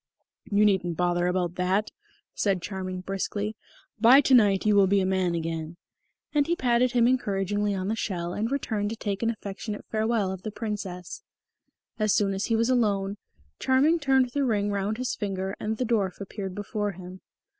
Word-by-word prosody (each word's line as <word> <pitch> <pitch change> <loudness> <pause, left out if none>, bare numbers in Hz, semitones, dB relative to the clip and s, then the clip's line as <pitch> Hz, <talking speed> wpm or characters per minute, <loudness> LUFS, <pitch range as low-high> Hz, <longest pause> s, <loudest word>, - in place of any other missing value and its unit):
"You 210 -1 +3
needn't 180 -5 +1
bother 175 0 +1
about 180 -1 0
that," 190 +3 0 0.4
said 195 -3 +1
Charming 185 -1 -4
briskly. 205 +3 -3 0.4
"By 240 +5 +8
to 270 - +2
night 205 -6 +5
you 210 -1 +4
will 200 -1 +6
be 200 +1 +3
a 190 - +1
man 185 -2 +1
again." 165 0 -4 0.6
And 290 -1 +2
he 345 - +1
patted 245 -2 +2
him 240 -1 +4
encouragingly 205 -4 0
on 185 0 -3
the 220 - 0
shell 175 -5 -3
and 220 +5 -2
returned 220 -7 -1
to 225 - -4
take 205 -3 -3
an 230 - +1
affectionate 205 -1 -5
farewell 220 -3 +1
of 190 -1 -6
the 215 - -4
Princess. 200 -5 -5 0.8
As 215 -3 +2
soon 200 -1 +2
as 195 +1 -2
he 230 - +1
was 230 +3 +2
alone, 205 -5 +1 0.4
Charming 280 +6 +3
turned 265 -4 +2
the 285 +2 0
ring 205 -5 +1
round 200 +2 -1
his 255 0 -2
finger, 195 -2 -3
and 220 +1 -2
the 255 - -1
dwarf 210 -6 0
appeared 195 -1 -6
before 205 0 -3
him. 185 +1 -10
205 Hz, 185 wpm, -26 LUFS, 190-225 Hz, 0.8 s, By